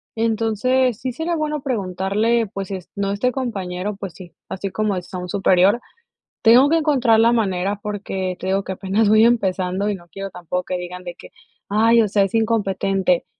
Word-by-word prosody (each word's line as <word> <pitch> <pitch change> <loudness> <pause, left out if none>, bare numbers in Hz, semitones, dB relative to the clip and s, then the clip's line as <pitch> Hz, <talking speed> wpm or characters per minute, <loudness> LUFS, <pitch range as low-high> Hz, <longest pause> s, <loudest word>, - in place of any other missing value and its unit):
Entonces 230 +2 +1
sí 255 0 -2
sería 325 +6 -2
bueno 300 -2 -2
preguntarle 215 -1 0
pues, 195 0 -6
es 185 -2 -6
no 200 -1 -1
este 230 +5 0
compañero, 205 -6 -3
pues 195 -4 -7
sí, 175 0 -13
así 195 +1 -4
como 215 0 -1
es 180 +1 -7
a - - -3
un 180 0 -5
superior. 195 +3 +3 0.6
Tengo 245 +4 +7
que 330 - +3
encontrar 260 -8 +3
la 230 - +5
manera 200 -3 0
porque 195 -3 -3
te 185 - -6
digo 195 +1 +1
que 190 - -3
apenas 195 +3 0
voy 215 +1 +5
empezando, 195 -4 +1
y 205 - -1
no 175 -2 -14
quiero 195 0 -6
tampoco 180 0 -4
que 180 - -3
digan 180 +1 -7
de 175 -1 -6
que: - - -13 0.4
"Ay, 225 +3 +4
o 220 - +2
sea, 200 0 +3
es 195 - -3
incompetente". 195 -5 +1
200 Hz, 195 wpm, -21 LUFS, 185-230 Hz, 0.6 s, Tengo